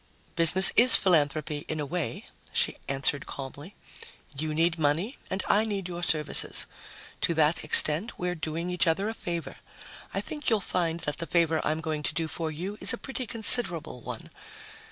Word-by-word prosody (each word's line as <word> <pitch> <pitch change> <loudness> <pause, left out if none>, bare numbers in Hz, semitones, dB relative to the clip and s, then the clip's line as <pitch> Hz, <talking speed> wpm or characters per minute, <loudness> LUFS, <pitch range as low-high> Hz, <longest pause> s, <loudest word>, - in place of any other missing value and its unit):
"Business 175 +3 +7
is 250 +2 +8
philanthropy, 150 -3 0
in 155 - -5
a 150 - -3
way," 170 +3 -5 0.3
she - - -1
answered 140 +1 0
calmly. 140 +7 -9 0.6
"You 155 +2 -3
need 165 +1 0
money 160 - -2
and 190 0 -3
I 210 - +2
need 200 -4 -4
your 175 -1 -7
services. 155 -3 +1 0.6
To 170 - 0
that 155 +1 +1
extent, 155 +6 +5
we're 180 0 -3
doing 165 +1 -5
each 180 0 0
other 195 +6 0
a - - -5
favor. 170 -6 -7 0.5
I - - -3
think 300 -1 -5
you'll 220 -3 +1
find 170 -3 -3
that 150 - -4
the 165 - -6
favor 165 -2 0
I'm 155 +1 -2
going 155 -2 -4
to - - -5
do 165 -2 -2
for 160 0 -5
you 185 +7 -7
is - - +4
a - - -4
pretty 260 -1 -6
considerable 205 - +3
one. 120 -2 -9
165 Hz, 175 wpm, -26 LUFS, 155-190 Hz, 0.6 s, is